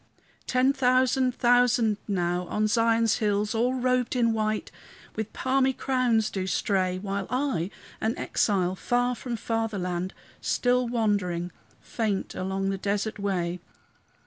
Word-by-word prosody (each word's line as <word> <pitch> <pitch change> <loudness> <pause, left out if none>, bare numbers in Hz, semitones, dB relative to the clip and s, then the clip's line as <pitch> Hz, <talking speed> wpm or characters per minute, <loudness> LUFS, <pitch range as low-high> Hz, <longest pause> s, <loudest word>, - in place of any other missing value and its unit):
Ten 255 +2 +3
thousand 255 -1 +2
thousand 245 -3 +3
now, 180 -2 -1
on 215 +4 0
Zion's 230 0 +3
hills, 210 0 0
All 245 +3 +1
robed 255 -1 +1
in 230 -2 +3
white, 215 -1 -1 0.4
with 220 -1 -4
palmy 265 0 +1
crowns, 245 -5 +1
do 190 -1 -3
stray, 185 -1 0
While 195 0 -3
I, 255 - -1 0.3
an 220 +2 0
exile, 185 -3 +1
far 245 +5 0
from 245 0 -5
fatherland, 195 -6 -2 0.3
Still 250 0 +1
wandering, 200 -7 0 0.3
faint 215 -4 -2
along 195 +1 -2
the 195 - -3
desert 205 +2 -2
way. 180 -3 -1
220 Hz, 125 wpm, -27 LUFS, 195-245 Hz, 0.4 s, Ten